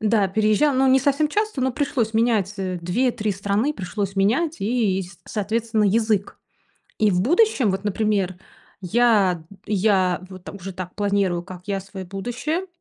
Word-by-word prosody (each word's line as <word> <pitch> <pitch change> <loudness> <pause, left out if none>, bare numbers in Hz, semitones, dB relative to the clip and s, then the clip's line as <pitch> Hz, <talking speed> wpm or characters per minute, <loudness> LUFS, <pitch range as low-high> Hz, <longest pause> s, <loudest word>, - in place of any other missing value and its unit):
Да, 215 -3 +2
переезжа 215 +8 +2
но 265 +1 +3
не 260 +1 +6
совсем 285 +3 +2
часто, 425 -4 -1
но 260 0 +1
пришлось 240 -4 -1
менять, 220 -4 +2
э, 185 -2 -3
2-3 215 +4 0
страны 200 +8 0
пришлось 195 -3 -4
менять 265 +12 +1
и, 210 -3 +1
и 180 -2 -7
соответственно, 220 +1 -1
язык. 215 -1 +1 0.6
И 215 -2 +3
в 180 -2 +1
будущем, 330 - +3
вот 190 +2 -3
например, 205 -3 0 0.4
я, 195 -4 +2 0.2
я, 190 -3 +2
вот 185 -2 -12
там 200 - -8
уже 195 0 -7
так 180 -1 -7
планирую, 200 -4 0
как 180 0 -10
я, 195 -1 -1
свое 190 0 -8
будущее. 245 - -3
210 Hz, 160 wpm, -22 LUFS, 190-240 Hz, 0.6 s, не